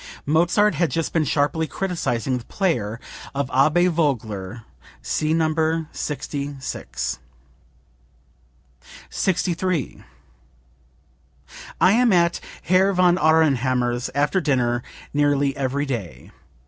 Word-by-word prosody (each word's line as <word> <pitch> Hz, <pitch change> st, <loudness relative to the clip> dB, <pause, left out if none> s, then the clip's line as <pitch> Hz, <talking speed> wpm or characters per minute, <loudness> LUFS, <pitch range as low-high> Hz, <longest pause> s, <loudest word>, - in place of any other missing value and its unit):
Mozart 175 Hz, +8 st, +3 dB
had 170 Hz, -3 st, +1 dB
just 165 Hz, -1 st, -2 dB
been 160 Hz, -2 st, +2 dB
sharply 150 Hz, +3 st, 0 dB
criticizing 135 Hz, -, -2 dB
the 115 Hz, -, -13 dB
playing 120 Hz, -, -1 dB, 0.4 s
of 140 Hz, -1 st, -2 dB
Abbe 155 Hz, +6 st, +4 dB
Vogler. 115 Hz, -, -1 dB, 0.4 s
[See 155 Hz, 0 st, -1 dB
No. 160 Hz, -1 st, +2 dB, 0.4 s
66.]) 135 Hz, -, -4 dB, 1.9 s
63. 180 Hz, -4 st, -1 dB, 1.8 s
"I 185 Hz, -, +5 dB
am 240 Hz, +2 st, +4 dB
at 170 Hz, -2 st, +3 dB, 0.2 s
Herr 190 Hz, +2 st, +3 dB
von 180 Hz, -1 st, +3 dB
Aurnhammer's 130 Hz, -6 st, +2 dB
after 145 Hz, +7 st, +1 dB
dinner 125 Hz, -5 st, +1 dB, 0.3 s
nearly 145 Hz, -1 st, +2 dB
every 140 Hz, +1 st, -1 dB
day. 115 Hz, -, -6 dB
145 Hz, 95 wpm, -22 LUFS, 125-170 Hz, 1.9 s, I